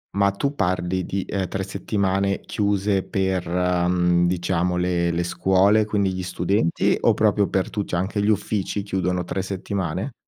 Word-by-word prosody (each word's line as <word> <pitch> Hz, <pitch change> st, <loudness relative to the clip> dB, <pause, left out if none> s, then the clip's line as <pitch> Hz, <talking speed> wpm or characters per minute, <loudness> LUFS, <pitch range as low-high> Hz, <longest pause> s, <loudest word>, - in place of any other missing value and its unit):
Ma 100 Hz, 0 st, +3 dB
tu 140 Hz, +9 st, -2 dB
parli 90 Hz, -4 st, -1 dB
di 95 Hz, 0 st, -2 dB
eh 95 Hz, -2 st, -2 dB
3 95 Hz, +1 st, -3 dB
settimane 100 Hz, 0 st, -1 dB
chiuse 100 Hz, -1 st, 0 dB
per, 95 Hz, -2 st, -1 dB
mhmm, 90 Hz, 0 st, +2 dB
diciamo 90 Hz, 0 st, 0 dB
le 90 Hz, -1 st, +1 dB
le 85 Hz, +1 st, 0 dB
scuole, 95 Hz, +4 st, +3 dB
quindi 100 Hz, -2 st, 0 dB
gli 95 Hz, -, -4 dB
studenti 90 Hz, 0 st, +1 dB
o -, -, +4 dB
proprio 105 Hz, -2 st, +2 dB
per 95 Hz, -, -1 dB
tu 105 Hz, -, -2 dB
cioè 85 Hz, -, -2 dB
anche 100 Hz, +3 st, -1 dB
gli 105 Hz, -, +1 dB
uffici 105 Hz, -1 st, -1 dB
chiudono 90 Hz, -2 st, -1 dB
3 95 Hz, +2 st, -3 dB
settimane? 95 Hz, -, -3 dB
95 Hz, 165 wpm, -23 LUFS, 90-100 Hz, -, o